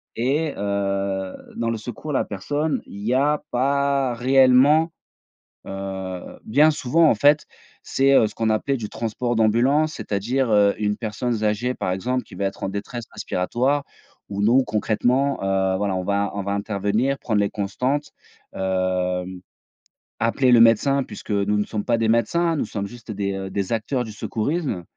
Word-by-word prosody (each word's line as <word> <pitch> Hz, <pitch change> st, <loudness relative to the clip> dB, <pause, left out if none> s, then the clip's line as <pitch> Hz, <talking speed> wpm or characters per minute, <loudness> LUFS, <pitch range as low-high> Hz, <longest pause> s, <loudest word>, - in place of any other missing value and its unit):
et 140 Hz, +6 st, 0 dB
heu, 100 Hz, -1 st, -2 dB, 0.2 s
dans 115 Hz, 0 st, -1 dB
le 115 Hz, -, -1 dB
secours 120 Hz, +7 st, -7 dB
à -, -, -3 dB
la -, -, +2 dB
personne, 145 Hz, +10 st, -2 dB
il 100 Hz, -, -10 dB
y 120 Hz, -, +1 dB
a 145 Hz, +3 st, +2 dB
pas 140 Hz, 0 st, +1 dB
réellement, 135 Hz, +6 st, +4 dB, 0.7 s
heu, 95 Hz, -2 st, -6 dB
bien 145 Hz, +8 st, +4 dB
souvent, 155 Hz, +2 st, +3 dB
en -, -, +4 dB
fait, 145 Hz, +7 st, +4 dB, 0.4 s
c'est, 135 Hz, +1 st, +2 dB
heu, 115 Hz, -, +6 dB
ce -, -, -8 dB
qu'on 110 Hz, -1 st, 0 dB
appelait 110 Hz, +6 st, 0 dB
du 110 Hz, -4 st, -5 dB
transport 120 Hz, +1 st, -2 dB
d'ambulance. 130 Hz, +8 st, +3 dB
C'est-à-dire, 120 Hz, +5 st, -1 dB
heu, 100 Hz, -1 st, +4 dB
une 105 Hz, -1 st, 0 dB
personne 115 Hz, +2 st, -3 dB
z 110 Hz, -2 st, -2 dB
âgée, 105 Hz, +4 st, 0 dB
par 90 Hz, -, -2 dB
exemple, 125 Hz, +6 st, -2 dB
qui -, -, -14 dB
va 100 Hz, -, -3 dB
être 95 Hz, -, -6 dB
en -, -, -1 dB
détresse 105 Hz, +4 st, -5 dB
respiratoire 130 Hz, +10 st, -1 dB, 0.4 s
où 100 Hz, 0 st, -3 dB
nous, 125 Hz, +5 st, +4 dB
concrètement, 120 Hz, +6 st, +1 dB
heu, 95 Hz, -1 st, +1 dB
voilà, 100 Hz, -1 st, -1 dB
on 95 Hz, -, -2 dB
va 100 Hz, +1 st, 0 dB
on 100 Hz, -, -3 dB
va 100 Hz, +1 st, -3 dB
intervenir, 105 Hz, +6 st, 0 dB
prendre 110 Hz, -3 st, 0 dB
les 100 Hz, -, +2 dB
constantes, 125 Hz, +9 st, -2 dB, 0.4 s
hem, 95 Hz, -1 st, -1 dB, 0.8 s
appeler 125 Hz, +3 st, +2 dB
le 120 Hz, -, +7 dB
médecin 115 Hz, +5 st, +4 dB
puisque 110 Hz, -, -9 dB
nous 100 Hz, +1 st, +1 dB
ne 105 Hz, -, 0 dB
sommes 105 Hz, -2 st, -4 dB
pas 120 Hz, -2 st, +2 dB
des 115 Hz, -1 st, +1 dB
médecins, 115 Hz, +10 st, +2 dB
hein. -, -, -1 dB
Nous -, -, -1 dB
sommes 100 Hz, -2 st, -4 dB
juste 120 Hz, -1 st, -10 dB
des, 100 Hz, -1 st, -2 dB
heu, 95 Hz, 0 st, -5 dB
des 100 Hz, +1 st, -2 dB
acteurs 120 Hz, +3 st, -1 dB
du 110 Hz, -, -8 dB
secourisme 110 Hz, -, -2 dB
110 Hz, 180 wpm, -23 LUFS, 100-135 Hz, 0.8 s, le